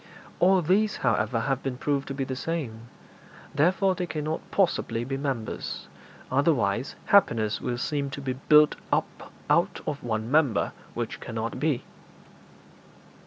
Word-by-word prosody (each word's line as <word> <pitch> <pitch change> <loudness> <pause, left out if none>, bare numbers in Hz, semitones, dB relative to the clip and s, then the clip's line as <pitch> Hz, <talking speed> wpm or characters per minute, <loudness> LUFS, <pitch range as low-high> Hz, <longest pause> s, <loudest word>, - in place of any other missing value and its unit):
All 185 0 +5
these, 200 +6 +2
however, 115 -3 +2
have 135 +2 -1
been 130 -2 -3
proved 140 +1 -1
to 135 - -4
be 135 - -1
the 130 0 -4
same; 130 -6 -4 0.7
therefore 185 +6 +3
they 180 -1 -3
cannot 155 0 -3
possibly 170 - +1
be 135 +2 -3
members, 135 -5 -4 0.4
otherwise 130 -5 +1
happiness 115 - +3
will 120 - -2
seem 140 +2 -1
to 140 - -6
be 135 -2 -2
built 150 +3 +5
up - - -1 0.2
out - - +2
of 145 -2 -4
one 110 0 -2
member, 145 -8 +3 0.2
which - - -3
cannot - - -4
be.' - - 0
140 Hz, 140 wpm, -27 LUFS, 120-160 Hz, 0.7 s, All